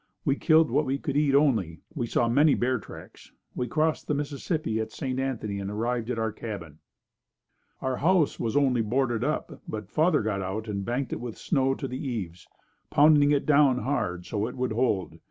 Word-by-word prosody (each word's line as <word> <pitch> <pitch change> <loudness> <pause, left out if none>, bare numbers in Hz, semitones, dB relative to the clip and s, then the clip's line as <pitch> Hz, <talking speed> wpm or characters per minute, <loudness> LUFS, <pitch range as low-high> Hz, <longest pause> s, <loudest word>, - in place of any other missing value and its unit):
We 140 -3 +2
killed 160 -1 +4
what 145 +3 +1
we 135 +1 0
could 140 0 -4
eat 145 -2 +3
only. 110 - +2
We 125 -7 -2
saw 120 - +1
many 145 +5 +4
bear 125 0 0
tracks. - - -13 0.2
We 125 - -2
crossed 155 +5 0
the 150 - 0
Mississippi 145 - -2
at 110 - -3
St. 130 -1 -3
Anthony 110 -7 -2
and 100 0 -4
arrived 115 +2 -2
at 125 - -2
our 110 -1 -1
cabin. 95 -10 -7 1.0
Our 130 -1 -1
house 170 -1 +2
was 115 +4 0
only 130 -4 +3
boarded 120 +1 0
up 150 0 -3
but 105 -2 -6
father 155 -4 +3
got 105 -2 -1
out 100 +4 -4
and 100 -2 -3
banked 125 +4 -2
it - - -4
with 120 -3 -6
snow 135 -4 +1
to 135 - -4
the 130 +2 -5
eaves, 95 - -5 0.4
pounding 145 -1 +5
it 145 -1 +1
down 140 -3 +4
hard 105 -10 -2
so 105 0 -2
it 125 - -7
would 125 -1 -1
hold. 110 -7 -1
125 Hz, 195 wpm, -27 LUFS, 110-145 Hz, 1.0 s, pounding